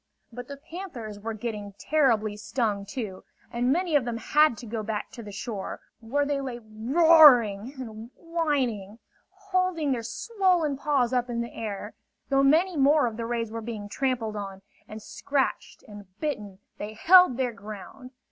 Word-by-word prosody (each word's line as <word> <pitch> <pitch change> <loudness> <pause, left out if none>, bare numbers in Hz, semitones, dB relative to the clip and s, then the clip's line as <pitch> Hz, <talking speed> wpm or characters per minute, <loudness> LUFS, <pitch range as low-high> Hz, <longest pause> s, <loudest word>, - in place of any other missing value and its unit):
But 245 +1 -8
the 280 - -8
panthers 275 - -8
were 225 +1 -5
getting 210 -3 -5
terribly 225 -4 +1
stung, 210 -2 -2
too; 205 -5 -6 0.3
and 245 +2 +1
many 345 +1 +1
of 285 - +4
them 235 -1 -3
had 300 +1 +3
to 240 - -9
go 225 0 -4
back 215 0 -4
to 240 - -9
the 210 -2 -9
shore, 205 -1 -5 0.2
where 270 +6 -1
they 285 -1 -1
lay 255 -3 -5
roaring 240 -1 +5
and 225 -3 -8
whining, 270 - -2 0.3
holding 370 -5 -1
their 245 -3 0
swollen 355 - 0
paws 270 -3 +1
up 250 0 0
in 235 -1 -2
the 235 - -6
air. 210 -3 -5 0.4
Though 275 -1 +3
many 325 +7 +3
more 290 0 +4
of 230 -2 -2
the 230 0 -4
rays 230 -2 -2
were 230 0 -5
being 215 -2 -6
trampled 240 -3 -1
on, 195 -2 -6 0.2
and 215 0 -9
scratched 275 +3 -2
and 205 -2 -11
bitten, 210 -11 -4 0.2
they 210 +1 -5
held 360 - +6
their 250 -2 -1
ground. 215 +5 -10
240 Hz, 165 wpm, -26 LUFS, 215-290 Hz, 0.4 s, held